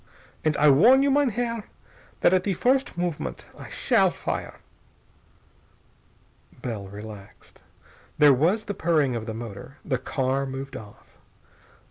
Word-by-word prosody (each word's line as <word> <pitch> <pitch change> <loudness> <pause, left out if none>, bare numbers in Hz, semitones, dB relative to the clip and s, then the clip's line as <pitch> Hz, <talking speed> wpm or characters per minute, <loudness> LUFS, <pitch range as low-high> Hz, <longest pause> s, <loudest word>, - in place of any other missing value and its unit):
And 155 -1 +1
I 150 - +4
warn 230 - +6
you, 280 - +3
mein 285 -1 +3
Herr, 230 -1 -3 0.6
that 175 - +5
at 185 -1 +3
the 195 -2 -1
first 265 - +1
movement 165 - -3
I - - -11
shall - - +2
fire." - - -5 2.1
Bell 110 -6 -4
relaxed. 100 0 -12 0.6
There 145 -2 +7
was 175 - +2
the 205 - -3
purring 155 -8 +1
of 115 0 -5
the 110 - -4
motor. 115 +4 -9
The 130 -4 -1
car 135 +1 -1
moved 135 +1 -6
off. 105 -4 -13
145 Hz, 135 wpm, -25 LUFS, 120-200 Hz, 2.1 s, There